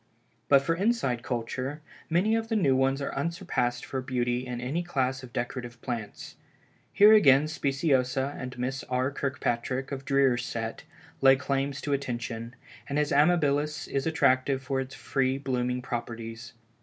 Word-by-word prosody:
But 140 -1 +6
for 165 - +1
inside 180 - 0
culture, 125 +4 -3 0.3
many 185 +7 +2
of 225 0 -1
the 225 - 0
new 140 -11 +3
ones 135 +1 +1
are - - -3
unsurpassed 140 -6 -1
for 130 - -3
beauty 125 -1 -1
in 125 -1 -4
any 135 +8 -2
class 130 -6 -1
of 130 -2 -11
decorative 120 0 -4
plants. 115 -5 -6 0.5
Here 210 +2 +7
again 145 -8 +6
Speciosa 135 -2 0
and 130 -1 -7
Miss 130 +2 -3
R. 130 +2 0
Kirkpatrick 135 -1 -2
of 135 -1 -4
Dreer's 135 -3 +2
set, 115 -1 -5 0.4
lay 135 0 +7
claims 140 0 -2
to 145 - -1
attention, 120 -3 -4 0.3
and 140 - -1
his 150 -1 +1
Amabilis 150 -1 +2
is 135 +2 -1
attractive 135 -3 +2
for 135 0 -1
its 130 0 -7
free 135 -1 0
blooming 125 -2 -2
properties. 115 0 -6
135 Hz, 155 wpm, -28 LUFS, 125-145 Hz, 0.5 s, Here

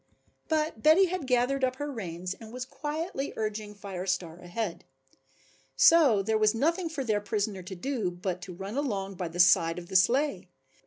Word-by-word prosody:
But 310 -7 0
Betty 315 - +6
had 360 -6 -3
gathered 255 +2 +1
up 255 0 +1
her 290 +2 -4
reins 180 -6 -5
and 220 +2 -12
was 250 +1 -5
quietly 295 +3 -4
urging 215 -1 -4
Fire 195 -2 -6
Star 175 -2 -2
ahead. 180 +1 -4 0.9
So 280 -12 +6
there 220 +2 +1
was 215 +1 +3
nothing 330 +7 +1
for 305 -4 -3
their 215 -4 0
prisoner 205 -1 -2
to 190 +2 -8
do 225 0 -2
but 180 0 -4
to 180 0 -8
run 195 +4 -6
along 200 -9 -2
by 180 -1 -4
the 170 +2 -8
side 170 -2 +5
of 175 0 -8
the 190 - -7
sleigh. 265 +10 +2
215 Hz, 180 wpm, -28 LUFS, 185-275 Hz, 0.9 s, Betty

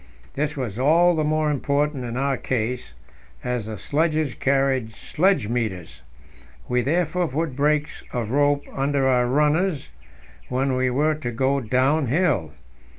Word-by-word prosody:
This 150 +1 -2
was 120 -5 -4
all 170 +6 +4
the 155 -2 0
more 155 0 +1
important 145 0 0
in 120 +1 -4
our 135 +1 +1
case, 125 - -3 0.5
as 125 -3 -2
the 110 -1 -5
sledges 155 - 0
carried 135 -4 0
sledge 170 - +1
meters. 95 - -3 0.7
We 125 0 +1
therefore 170 +5 0
put 150 0 -2
brakes 150 +2 0
of 115 -4 -3
rope 145 +1 +2
under 135 0 0
our 125 -2 +3
runners 150 +4 +1 0.6
when 130 +1 0
we 130 0 +1
were 150 +5 +2
to 150 -5 -5
go 130 +4 +1
downhill. 130 - +1
135 Hz, 140 wpm, -23 LUFS, 125-150 Hz, 0.7 s, all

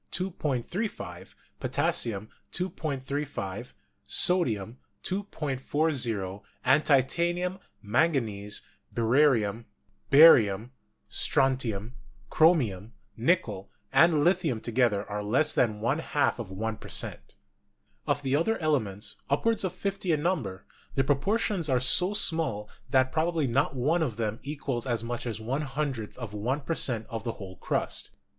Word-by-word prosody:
35; 180 - -4 0.2
potassium, 105 -2 0 0.2
2.35; 145 - -4 0.3
sodium, 120 - +2 0.2
2.40, 135 - -2 0.2
and 130 +4 +5
titanium, 175 +7 +1 0.2
manganese, 105 -5 0 0.3
barium, 115 -3 +2 0.4
88 140 - +6
GEOLOGY 110 -8 +6 0.4
strontium, 125 -5 +1 0.4
chromium, 120 - +3 0.2
nickel 115 - 0 0.2
and 160 -3 +5
lithium 170 -9 +2
together 115 -3 +1
are 105 0 -3
less 120 +9 +2
than 110 -4 +1
one 120 +8 0
half 145 -5 0
of 110 -5 -5
one 110 +3 -3
per - - -11
cent. - - -1 0.7
Of 145 0 0
the 135 0 +1
other 225 +9 +1
elements,, 110 - -1
upward 220 +11 +1
of 185 - -1
fifty 195 0 -2
in 150 -2 +1
number, 125 - -2 0.3
the 135 - +3
proportions 170 - 0
are 130 -2 +3
so 180 +10 +3
small 145 - +1 0.2
that 130 -1 +3
probably 160 -1 +1
not 135 +3 +1
one 150 +7 +1
of 125 -9 -1
them 110 -1 -2
equals 140 -3 -4
as 120 -3 -1
much 120 +1 -4
as 110 -2 -3
one 125 +7 -2
hundredth 135 -6 -3
of 120 -5 -7
one 125 +8 -1
per 165 - -2
cent, 115 -8 0
of 115 -2 -5
the 115 - -3
whole 95 -4 -10
crust. - - -2
130 Hz, 125 wpm, -28 LUFS, 110-160 Hz, 0.7 s, 88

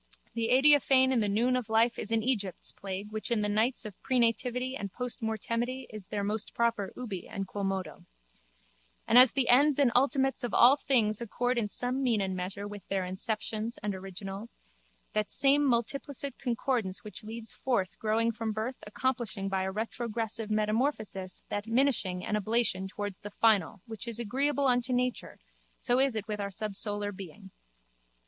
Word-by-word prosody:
The 230 -1 -1
adiaphane 265 0 +5
in 255 - +3
the 210 -2 +1
noon 235 +5 +2
of 250 -4 -3
life 230 +2 +3
is 215 - -2
an 225 -1 +1
Egypt's 205 -8 0
plague 195 +2 -6
which 215 0 -4
in 235 -3 +2
the 210 - +1
nights 220 +4 +1
of 210 - -6
prenativity 250 +1 0
and 200 -6 -5
postmortemity 240 +2 -3
is 210 -3 -7
their 205 -1 -3
most 210 +1 -3
proper 230 -4 0
ubi 215 -8 -6
and 195 -2 -5
quomodo. 195 -1 -4 1.0
And 240 - +7
as 255 -1 +8
the 270 -4 +1
ends 280 +4 +5
and 275 -4 +4
ultimates 270 +1 +2
of 240 - -2
all 250 +3 +7
things 235 -7 +2
accord 245 +2 -1
in 215 - -1
some 250 +5 -1
mean 240 -5 +2
and 190 -1 -2
measure 195 +3 -5
with 205 -1 -8
their 195 -1 -1
inceptions 215 +4 -3
and 210 -1 -1
originals, 195 +3 -8 0.6
that 215 -1 0
same 280 +1 +4
multiplicit 270 +3 0
concordance 235 -5 -1
which 210 +1 -8
leads 225 0 +1
forth 215 -8 -2
growth 225 +1 +1
from 225 -1 -3
birth 225 +4 -3
accomplishing 220 -4 -2
by 190 -1 0
a 190 0 -2
retrogressive 225 0 -3
metamorphosis 215 -3 -1
that 205 0 -3
minishing 225 -7 +1
and 210 - -1
ablation 210 -2 0
towards 205 -1 -5
the 205 - -8
final 205 -4 +2
which 225 +2 -8
is 235 -1 -2
agreeable 275 +5 0
unto 250 0 +2
nature 250 0 -1 0.4
so 245 +1 +1
is 270 -3 +2
it 215 -1 -4
with 210 -1 -3
our 200 - -3
subsolar 205 0 -2
being. 190 +1 -11
225 Hz, 170 wpm, -29 LUFS, 205-250 Hz, 1.0 s, as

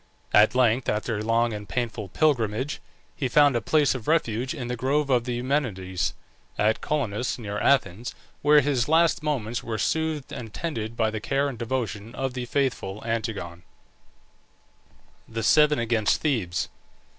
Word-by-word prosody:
At 105 +3 +6
length, 125 0 +3
after 105 +1 -1
a - - -3
long 115 +1 +2
and 105 -1 -7
painful 115 -4 -3
pilgrimage, 130 - 0 0.3
he 135 - -1
found 145 +1 +5
a 120 - +1
place 145 +5 +3
of 125 -5 -7
refuge 130 -5 +1
in 125 -5 -5
the 125 - -2
grove 140 +4 0
of 120 -2 +3
the 125 -1 -2
Eumenides 100 - -1 0.4
(at 110 +1 +2
Colonus, 125 -6 -1
near 105 -3 -4
Athens), 115 -2 +1 0.3
where 150 0 +6
his 135 -2 0
last 165 0 +4
moments 125 -7 -2
were 115 -2 -3
soothed 160 +1 -1
and 115 -3 -7
tended 115 -9 -4
by 110 -1 +2
the 110 -1 -4
care 140 +4 0
and 130 -5 -6
devotion 115 -2 -3
of 135 -1 -2
the 125 -1 -4
faithful 115 -7 -1
Antigone. 110 -7 -3 1.7
THE 115 0 -4
SEVEN 150 +5 +5
AGAINST 115 -2 +1
THEBES. 105 - 0
120 Hz, 155 wpm, -25 LUFS, 110-140 Hz, 1.7 s, At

